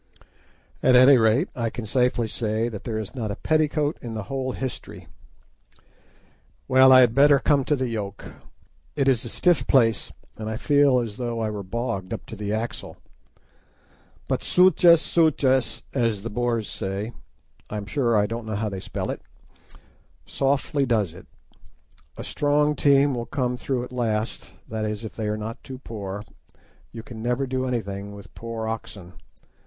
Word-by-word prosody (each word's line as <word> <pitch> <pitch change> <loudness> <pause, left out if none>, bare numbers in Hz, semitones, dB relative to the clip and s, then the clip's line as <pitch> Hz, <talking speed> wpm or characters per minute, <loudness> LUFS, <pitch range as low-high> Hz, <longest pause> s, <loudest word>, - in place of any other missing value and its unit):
At 130 - +5
any 130 +3 +8
rate, 115 - +3
I 115 -2 -1
can 120 0 -6
safely 125 0 +1
say 110 +1 -1
that 105 -4 -8
there 110 -2 -2
is 110 -3 -5
not 115 -5 -4
a 100 - -3
petticoat 155 -1 0
in 115 -2 -6
the 110 - -4
whole 130 -1 -2
history. 105 -7 -6 1.6
Well, 130 0 +6
I 130 0 +9
had 120 -2 +4
better 140 +2 +6
come 140 0 +2
to 150 - +2
the 130 -2 -2
yoke. 105 -4 -5 0.6
It 140 -2 +1
is 130 -4 +3
a - - -5
stiff 175 +6 +2
place, 115 -5 +3 0.3
and 110 0 -5
I 110 - -3
feel 145 -1 +4
as 110 -3 -6
though 120 -2 -3
I 110 -1 -1
were 105 -1 -5
bogged 100 -1 -4
up 110 - -6
to 115 - -8
the 105 -1 -4
axle. 110 +2 -4 1.3
But, - - -1
"sutjes, 180 -2 +5
sutjes," 140 -7 +1
as 115 -6 0
the 115 - -5
Boers 120 -1 -1
say—I 105 +1 -7
am 100 - -5
sure 120 -1 +1
I 105 - +3
don't 115 +1 -5
know 110 - -3
how 105 +1 -1
they 95 -1 -5
spell - - -4
it—softly 135 - -4
does 105 -8 +1
it. 90 - -13 0.9
A - - -6
strong 150 +1 +1
team 140 -1 +4
will 120 -1 -4
come 125 -3 -1
through 125 0 -2
at 125 - -9
last, 115 -3 -2
that 110 0 -4
is, 105 +1 -3
if 110 - -8
they 110 -2 -3
are 105 0 -1
not 110 +2 -6
too 130 - -8
poor. 105 -5 -6 0.7
You 115 -1 -8
can 115 -2 -9
never 125 +3 0
do 130 0 -2
anything 100 -4 -4
with 100 -4 -13
poor 115 -1 -5
oxen. 100 -5 -6
115 Hz, 170 wpm, -24 LUFS, 110-130 Hz, 1.6 s, I